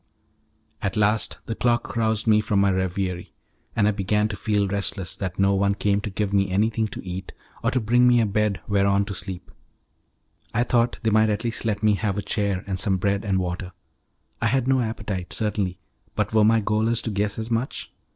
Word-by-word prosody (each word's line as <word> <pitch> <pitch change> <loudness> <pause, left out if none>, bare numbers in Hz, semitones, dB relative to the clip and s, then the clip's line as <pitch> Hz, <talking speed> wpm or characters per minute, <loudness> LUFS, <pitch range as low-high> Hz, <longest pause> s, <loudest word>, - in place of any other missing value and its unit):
At 100 +2 -2
last 105 +1 +2
the 115 - -3
clock 120 +1 0
roused 110 -1 +1
me 110 -1 +4
from 105 -2 +1
my 100 0 +4
reverie, 95 -1 -2 0.4
and 105 -2 +3
I - - +4
began 105 +2 +1
to 105 - -4
feel 105 -1 0
restless 95 -2 -2
that 95 -1 -4
no 100 0 +3
one 100 0 +2
came 100 0 +1
to 105 - -4
give 100 0 -2
me 100 -1 +2
anything 110 +3 +1
to 100 - -8
eat 90 +1 -6 0.3
or - - +2
to 130 - +1
bring 120 +2 +3
me 120 -1 +5
a 115 - +3
bed 105 -3 0
whereon 100 0 +2
to 100 - -5
sleep. 95 -1 -7 1.0
I 120 - +3
thought 120 -1 +1
they 110 - +2
might 110 +1 +4
at 105 +2 -1
least 115 -1 -3
let 105 -2 -1
me 105 -1 +5
have 105 -1 -1
a 105 - -2
chair 100 -3 -1
and 95 -2 -2
some 95 -2 +1
bread 100 +1 0
and 100 -3 0
water. 90 0 -3 0.7
I 115 - +2
had 130 +1 +1
no 135 -1 +3
appetite, 105 -6 -4
certainly; 100 -4 -1 0.4
but - - -1
were 110 -1 +5
my 110 +1 +4
gaolers 110 +2 +1
to 115 - -2
guess 105 +1 -1
as 110 +1 -4
much? 115 +4 -2
105 Hz, 210 wpm, -24 LUFS, 100-110 Hz, 1.0 s, me